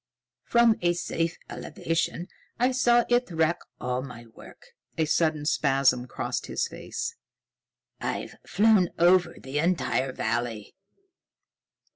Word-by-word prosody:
From 235 -2 +4
a 175 0 +3
safe 165 -1 -2
elevation 165 +1 -3 0.3
I 250 +2 +2
saw 240 -2 +3
it 245 -1 +2
wreck 165 0 +1 0.2
all 125 0 -2
my 125 -3 -9
work." 115 - -16 0.3
A 160 - +2
sudden 155 -1 +1
spasm 135 -4 +2
crossed - - -4
his - - -1
face. - - -5 0.9
"I've - - -4
flown 200 -1 +3
over 175 0 +4
the 135 +2 -3
entire 155 -5 0
valley. 115 -3 -3
165 Hz, 115 wpm, -27 LUFS, 130-185 Hz, 0.9 s, From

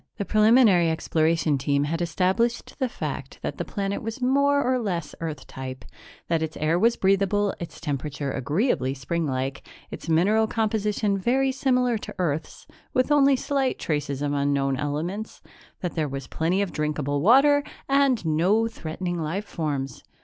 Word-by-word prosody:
The 200 - -2
preliminary 215 -5 +5
exploration 160 -2 +1
team 140 +1 +1
had 165 +4 -2
established 190 - 0
the 260 -2 0
fact - - -5
that - - -4
the - - 0
planet 200 -1 -3
was 225 +3 -5
more 280 +3 +3
or 255 0 +1
less 175 -9 -3
Earth 155 -4 -5
type, 130 0 -8 0.4
that 165 -1 +1
its 160 0 -3
air 160 +3 +1
was 230 +4 +4
breathable, 195 +1 +2
its 170 - -8
temperature 145 -2 -3
agreeably 140 - 0
springlike, 135 -1 -2 0.3
its - - -7
mineral 205 +7 +3
composition 210 -2 0
very 265 +6 +2
similar 250 -3 +1
to - - -8
Earth's, 160 -4 -3 0.3
with 255 +3 +2
only 280 -2 +5
slight 270 0 -1
traces 145 -2 -2
of 145 0 0
unknown 140 -1 +1
elements, 155 +10 -4 0.4
that 180 - -3
there 155 -3 -1
was 135 -1 -5
plenty 175 +9 0
of 195 - -4
drinkable 150 -2 -1
water 275 - +5 0.2
and 275 -7 +2
no 180 +9 +2
threatening 175 -3 -4
life 175 +7 -3
forms. 140 -8 -4
175 Hz, 155 wpm, -25 LUFS, 150-225 Hz, 0.4 s, preliminary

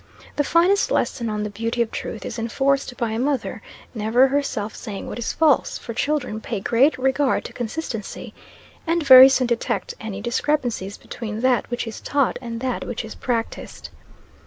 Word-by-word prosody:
The 290 - +2
finest 355 +7 +3
lesson 235 -3 0
on 210 -1 -2
the 210 - -4
beauty 230 +3 -3
of 225 - -9
truth 220 - -6
is - - -5
enforced 270 +2 0
by 235 -2 -1
a 220 - -2
mother 265 -2 -1 0.3
never 235 +4 +3
herself 260 -7 -2
saying 200 -3 -7
what - - -6
is 235 - -2
false; 310 -4 +2
for 230 - -7
children 250 -4 -1
pay 225 -2 -3
great 245 +9 +3
regard 265 +1 +1
to - - -8
consistency, 235 -3 -5 0.5
and 335 0 +1
very 260 0 +11
soon 265 -1 +2
detect 235 -3 -2
any 210 -3 -5
discrepancies 240 -3 -1
between 220 -2 -6
that 255 -3 +2
which 240 0 -2
is 225 -2 -7
taught 280 -3 0
and 230 -2 -6
that 255 -1 -2
which 235 -1 -4
is 220 - -8
practised. 230 -2 -4
240 Hz, 175 wpm, -22 LUFS, 225-270 Hz, 0.5 s, very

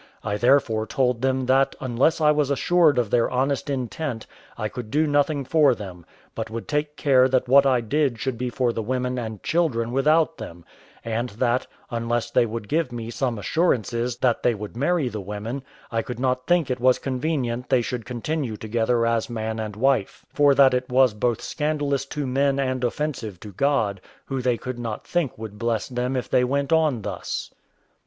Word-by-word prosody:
I 105 -1 -1
therefore 110 -2 +2
told 125 -4 0
them 130 0 +1
that 135 +2 +3
unless 130 +6 +1
I 150 -1 +5
was 150 -2 +1
assured 155 +1 +3
of 120 -4 0
their 120 -1 +3
honest 135 +3 -1
intent, 130 -1 -3 0.3
I 110 -2 -2
could 115 0 -7
do 150 +6 +2
nothing 145 -1 +1
for 150 -3 +4
them, 90 -6 -9 0.3
but 110 -1 -4
would 115 +1 -6
take 150 0 -1
care 130 -2 +4
that 130 -1 +1
what 140 +2 +6
I 125 -2 +3
did 135 +1 0
should 125 +3 -2
be 125 +2 -3
for 120 -1 0
the 115 - -2
women 125 +2 -2
and 110 -4 -6
children 135 -9 0
without 155 +3 +2
them; 85 -6 -9 0.4
and 115 +2 -2
that, 125 0 +1 0.2
unless 120 0 -1
they 120 - +3
would 115 -1 -5
give 160 -1 0
me 115 -1 -5
some 125 -2 -1
assurances 120 - 0
that 125 -3 +1
they 120 - +2
would 105 +1 -8
marry 150 +3 +1
the 110 -4 -4
women, 105 +7 -5 0.3
I 115 -1 0
could 120 +1 -7
not 130 0 -1
think 175 -6 +2
it 125 - -2
was 130 +1 +4
convenient 130 -3 -2
they 130 -3 +3
should 125 -1 -4
continue 125 0 -3
together 115 +2 0
as 115 0 0
man 110 -1 -3
and 105 -2 -4
wife; 130 -3 0
for 145 -1 +4
that 135 -1 +6
it 125 0 -1
was 130 -2 +4
both 115 +2 -1
scandalous 145 -3 -1
to 145 0 -3
men 135 +1 +1
and 130 -2 -1
offensive 120 - -3
to 105 - -9
God, 105 -4 0 0.2
who 135 -1 -3
they 125 -1 +1
could 125 0 -6
not 115 -3 -5
think 170 -8 -1
would 105 -2 -8
bless 115 -2 -1
them 125 +1 -2
if 125 - -2
they 125 - +3
went 140 +4 0
on 155 -9 +2
thus. - - -5
125 Hz, 195 wpm, -24 LUFS, 115-140 Hz, 0.4 s, what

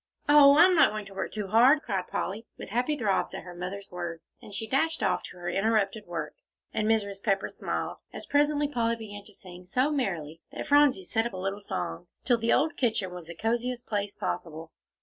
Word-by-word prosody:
"Oh, 290 -1 +8
I'm 365 +3 +7
not 330 - +6
going 215 -1 -5
to 195 - -12
work 195 - -4
too 210 -3 -4
hard," 255 +8 +5
cried 195 -4 -2
Polly, 215 +4 -4
with - - -8
happy 250 +8 0
throbs 205 -7 0
at - - -6
her 180 - -9
mother's 185 +3 -6
words. 170 -2 -7
And - - -12
she 205 +2 -4
dashed 320 +8 0
off - - +1
to - - -11
her 175 0 -7
interrupted 205 +2 0
work, 165 -3 -4 0.4
and 215 -1 0
Mrs. 200 -3 0
Pepper 195 -2 +1
smiled, - - -4
as - - -8
presently 290 0 +2
Polly 235 -4 0
began 205 -3 -9
to 210 - -15
sing 180 -1 -12
so 255 +11 +1
merrily 170 - -2
that - - -5
Phronsie 285 -9 +4
set 225 +5 0
up - - -10
a - - -5
little 195 +2 -3
song, 85 - -4 0.2
till 240 -3 +3
the 230 +1 +1
old 315 +2 +2
kitchen 215 -7 0
was 175 -2 -8
the 170 - -8
cosiest 240 +4 -1
place 205 -1 -2
possible. 160 0 -5
210 Hz, 210 wpm, -28 LUFS, 185-250 Hz, 0.4 s, Oh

